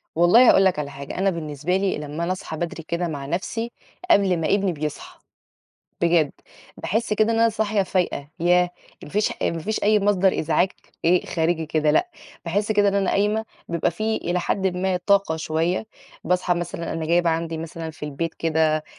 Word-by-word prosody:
والله 180 Hz, +9 st, +6 dB
هاقول 195 Hz, -, +6 dB
لك 185 Hz, -5 st, +2 dB
على 145 Hz, -1 st, -3 dB
حاجة، 140 Hz, 0 st, -8 dB
أنا 195 Hz, +1 st, +2 dB
بالنسبة 160 Hz, 0 st, -2 dB
لي 195 Hz, 0 st, 0 dB
لمّا 150 Hz, +2 st, -5 dB
أنا 175 Hz, -, -1 dB
أصحى 185 Hz, -3 st, -5 dB
بدري 170 Hz, 0 st, -4 dB
كده 170 Hz, +2 st, -2 dB
مع 145 Hz, -4 st, -5 dB
نَفْسي 225 Hz, +9 st, -3 dB, 0.4 s
قبل 195 Hz, -, +4 dB
ما 160 Hz, -, -1 dB
ابني 200 Hz, -2 st, +2 dB
بيصحى 150 Hz, -1 st, -6 dB, 0.8 s
بجد، 170 Hz, -4 st, +3 dB, 0.4 s
باحس 220 Hz, +1 st, -1 dB
كده 215 Hz, +2 st, +2 dB
إن 225 Hz, -, 0 dB
أنا 230 Hz, -, +5 dB
صاحية 215 Hz, -2 st, 0 dB
فايقة 180 Hz, -7 st, -1 dB
ياه! 175 Hz, +1 st, +3 dB, 0.3 s
ما -, -, -9 dB
فيش 210 Hz, +4 st, +1 dB
ما 165 Hz, -, 0 dB
فيش 210 Hz, +7 st, -3 dB
أي 210 Hz, 0 st, +4 dB
مصدر 195 Hz, -2 st, +2 dB
إزعاج 165 Hz, +4 st, +2 dB, 0.4 s
إيه 175 Hz, +2 st, +3 dB
خارجي 165 Hz, -1 st, 0 dB
كده 155 Hz, 0 st, +1 dB
لأ، 355 Hz, -, +2 dB, 0.3 s
باحس 205 Hz, +5 st, 0 dB
كده 205 Hz, -1 st, +3 dB
إن 200 Hz, -, 0 dB
أنا 195 Hz, -1 st, +1 dB
قايمة 210 Hz, +2 st, +1 dB, 0.2 s
بيبقى 170 Hz, -1 st, 0 dB
في 215 Hz, +5 st, -1 dB
إلى 175 Hz, +1 st, -1 dB
حد 195 Hz, +2 st, 0 dB
ما 185 Hz, 0 st, 0 dB
طاقة 200 Hz, -5 st, +3 dB
شوية 165 Hz, +5 st, -1 dB, 0.4 s
باصحى 180 Hz, +1 st, +1 dB
مثلًا 170 Hz, -1 st, -4 dB
أنا 160 Hz, -1 st, -3 dB
جايبة 170 Hz, 0 st, +3 dB
عندي 165 Hz, 0 st, -2 dB
مثلًا 165 Hz, 0 st, -6 dB
في 160 Hz, -, -19 dB
البيت 150 Hz, +3 st, -3 dB
كده 155 Hz, -1 st, +1 dB
175 Hz, 185 wpm, -23 LUFS, 160-200 Hz, 0.8 s, والله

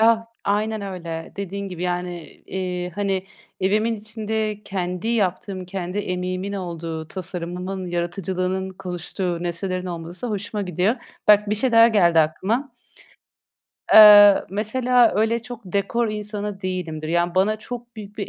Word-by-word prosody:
Ah, 225 Hz, 0 st, +4 dB, 0.2 s
aynen 215 Hz, +2 st, 0 dB
öyle. 170 Hz, -4 st, -6 dB
Dediğin 200 Hz, 0 st, -4 dB
gibi, 180 Hz, -1 st, -7 dB
yani, 175 Hz, -2 st, -4 dB
iii, 180 Hz, -1 st, -3 dB
hani 195 Hz, 0 st, -1 dB, 0.4 s
evimin 215 Hz, +4 st, +2 dB
içinde 215 Hz, 0 st, -3 dB
kendi 180 Hz, +1 st, -3 dB
yaptığım, 190 Hz, -3 st, -1 dB
kendi 185 Hz, +1 st, -4 dB
emeğimin 185 Hz, +1 st, -3 dB
olduğu, 165 Hz, -4 st, -5 dB
tasarımımın, 180 Hz, +1 st, -4 dB
yaratıcılığının 185 Hz, +2 st, -2 dB
konuştuğu 180 Hz, -1 st, -4 dB
nesnelerin 180 Hz, +2 st, -2 dB
olması 175 Hz, +5 st, -5 dB
hoşuma 210 Hz, -1 st, -3 dB
gidiyor. 180 Hz, +4 st, +1 dB, 0.3 s
Bak, 210 Hz, 0 st, +6 dB
bir 210 Hz, -, +2 dB
şey 240 Hz, +3 st, +1 dB
daha 230 Hz, 0 st, +8 dB
geldi 175 Hz, -7 st, +4 dB
aklıma. 215 Hz, -, -1 dB, 1.2 s
Iıı, 205 Hz, -2 st, +9 dB
mesela 240 Hz, +4 st, +2 dB
öyle 225 Hz, +2 st, +1 dB
çok 245 Hz, -1 st, -8 dB
dekor 200 Hz, +5 st, 0 dB
insanı 210 Hz, -1 st, -4 dB
değilimdir, 175 Hz, -5 st, -4 dB
yani 175 Hz, +1 st, +1 dB
bana 205 Hz, +3 st, +2 dB
çok 240 Hz, +1 st, -8 dB
büyük 210 Hz, 0 st, -10 dB
bir 200 Hz, -, -3 dB
195 Hz, 130 wpm, -22 LUFS, 180-215 Hz, 1.2 s, Iıı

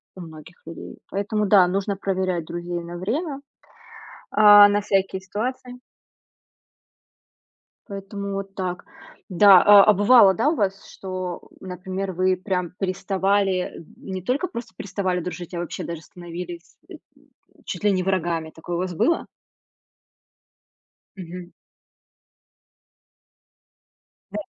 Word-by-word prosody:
у 185 Hz, -, -9 dB
многих 160 Hz, +1 st, -12 dB
людей. 165 Hz, -, -10 dB
Поэтому, 210 Hz, +2 st, -1 dB
да, 190 Hz, -3 st, +6 dB
нужно 195 Hz, +2 st, -2 dB
проверять 185 Hz, -3 st, -2 dB
друзей 175 Hz, +1 st, -5 dB
на 170 Hz, +1 st, -8 dB
время, 275 Hz, -, -3 dB, 0.9 s
а, 205 Hz, -1 st, +8 dB
на 205 Hz, 0 st, +1 dB
всякие 195 Hz, -1 st, 0 dB
ситуации. 250 Hz, +5 st, -5 dB, 2.1 s
Поэтому 200 Hz, 0 st, -6 dB
вот 195 Hz, 0 st, -5 dB
так. 180 Hz, -2 st, -4 dB, 0.4 s
Да, 190 Hz, 0 st, +7 dB
а 205 Hz, -1 st, +8 dB
а 210 Hz, -, +5 dB
бывало, 205 Hz, 0 st, +6 dB
да, 230 Hz, +9 st, +1 dB
у 325 Hz, -, 0 dB
вас, 195 Hz, -3 st, -2 dB
что, 185 Hz, -2 st, -6 dB
например, 185 Hz, +1 st, -5 dB
вы 185 Hz, +1 st, +2 dB
прям 185 Hz, -2 st, -3 dB
переставали, 195 Hz, 0 st, 0 dB
эм, 165 Hz, -, -11 dB
не 190 Hz, -1 st, -6 dB
только 255 Hz, -, -1 dB
просто 235 Hz, -, -8 dB
переставали 190 Hz, -1 st, -2 dB
дружить, 180 Hz, 0 st, -7 dB
а 170 Hz, -, -3 dB
вообще 175 Hz, -, -5 dB
даже 170 Hz, -2 st, -6 dB
становились, 175 Hz, 0 st, -9 dB
э, -, -, -9 dB, 0.7 s
чуть -, -, -6 dB
ли 205 Hz, -, +4 dB
не 185 Hz, -1 st, 0 dB
врагами, 170 Hz, -4 st, -1 dB
такое 170 Hz, +2 st, -6 dB
у 170 Hz, -, -2 dB
вас 180 Hz, -1 st, -3 dB
было? 335 Hz, -, +1 dB, 1.9 s
Мгм. 180 Hz, -1 st, -9 dB, 2.8 s
Да. -, -, -4 dB
190 Hz, 120 wpm, -23 LUFS, 180-200 Hz, 2.8 s, а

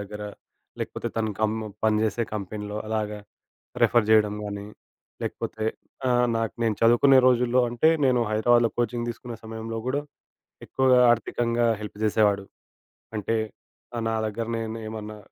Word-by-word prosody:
దగ్గర, 105 Hz, +1 st, -7 dB, 0.6 s
లేకపోతే -, -, -3 dB
తను 110 Hz, -1 st, 0 dB
కం 110 Hz, 0 st, +2 dB, 0.3 s
పనిచేసే 110 Hz, +1 st, +2 dB
కంపెనీలో, 105 Hz, +1 st, -5 dB
అలాగా 105 Hz, -1 st, -2 dB, 0.6 s
రిఫర్ 120 Hz, -3 st, +4 dB
చేయడం 105 Hz, -1 st, +5 dB
గానీ. 100 Hz, 0 st, -5 dB, 0.6 s
లేకపోతే 110 Hz, 0 st, -4 dB, 0.4 s
ఆహ్, 125 Hz, 0 st, +3 dB
నాకు 115 Hz, -2 st, -2 dB
నేను 110 Hz, -2 st, +2 dB
చదువుకునే 120 Hz, +4 st, +6 dB
రోజుల్లో 125 Hz, 0 st, +3 dB
అంటే, 120 Hz, +7 st, +3 dB, 0.2 s
నేను 125 Hz, -2 st, +3 dB
హైదరాబాద్‌లో 115 Hz, +2 st, +4 dB
కోచింగ్ 120 Hz, 0 st, -1 dB
తీసుకునే 120 Hz, 0 st, -8 dB
సమయంలో 115 Hz, 0 st, -5 dB
గూడా, 145 Hz, +2 st, 0 dB, 0.6 s
ఎక్కువగా 130 Hz, -1 st, +4 dB
ఆర్థికంగా 120 Hz, 0 st, 0 dB, 0.2 s
హెల్ప్ 105 Hz, -1 st, -8 dB
జేసేవాడు. 105 Hz, -2 st, +2 dB, 0.7 s
అంటే, 110 Hz, +2 st, -1 dB, 0.6 s
ఆహ్, 115 Hz, -, -2 dB
నా 115 Hz, -, 0 dB
దగ్గర 115 Hz, +2 st, -4 dB
నేను 115 Hz, 0 st, -4 dB
ఏమన్నా, 110 Hz, -1 st, -7 dB
115 Hz, 130 wpm, -25 LUFS, 105-120 Hz, 0.7 s, చదువుకునే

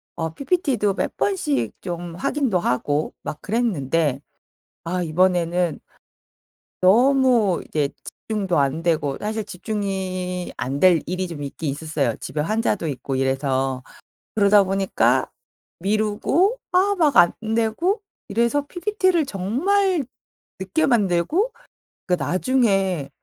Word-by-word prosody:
어 165 Hz, -1 st, -2 dB
PPT도 270 Hz, -, 0 dB
몇 -, -, -3 dB
번씩 355 Hz, -8 st, 0 dB
좀 175 Hz, -2 st, -5 dB
확인도 225 Hz, -1 st, 0 dB
하고 145 Hz, +1 st, -1 dB
막 150 Hz, -, -6 dB
그랬는데 165 Hz, -, 0 dB, 0.6 s
아 180 Hz, +2 st, -2 dB
이번에는 175 Hz, 0 st, +1 dB, 1.0 s
너무 240 Hz, -1 st, +4 dB
이제 145 Hz, -2 st, 0 dB, 0.2 s
집중도 195 Hz, -7 st, -2 dB
안 140 Hz, +4 st, +1 dB
되고 150 Hz, -5 st, 0 dB
사실 215 Hz, 0 st, -3 dB
집중이 185 Hz, -2 st, -4 dB
안 135 Hz, +3 st, -2 dB
될 180 Hz, -4 st, +6 dB
일이 185 Hz, +1 st, -2 dB
좀 160 Hz, -4 st, -7 dB
있긴 140 Hz, +1 st, -4 dB
있었어요. 145 Hz, -5 st, -2 dB
집에 150 Hz, -, -4 dB
환자도 210 Hz, -2 st, 0 dB
있고 135 Hz, -1 st, -3 dB
이래서. 135 Hz, -1 st, 0 dB, 0.5 s
그러다 205 Hz, -1 st, +5 dB
보니까 195 Hz, 0 st, +1 dB, 0.5 s
미루고 215 Hz, -, +1 dB, 0.2 s
아 390 Hz, +3 st, +3 dB
막 300 Hz, -6 st, +3 dB
안되고 225 Hz, -, +2 dB, 0.3 s
이래서 235 Hz, +7 st, +1 dB
PPT를 370 Hz, -4 st, +1 dB
정말 310 Hz, -, +1 dB, 0.6 s
늦게 190 Hz, +12 st, 0 dB
만들고 240 Hz, -, +1 dB, 0.6 s
그러니까 175 Hz, -7 st, 0 dB
나중에 195 Hz, -, +1 dB
190 Hz, 245 characters per minute, -22 LUFS, 165-245 Hz, 1.0 s, 될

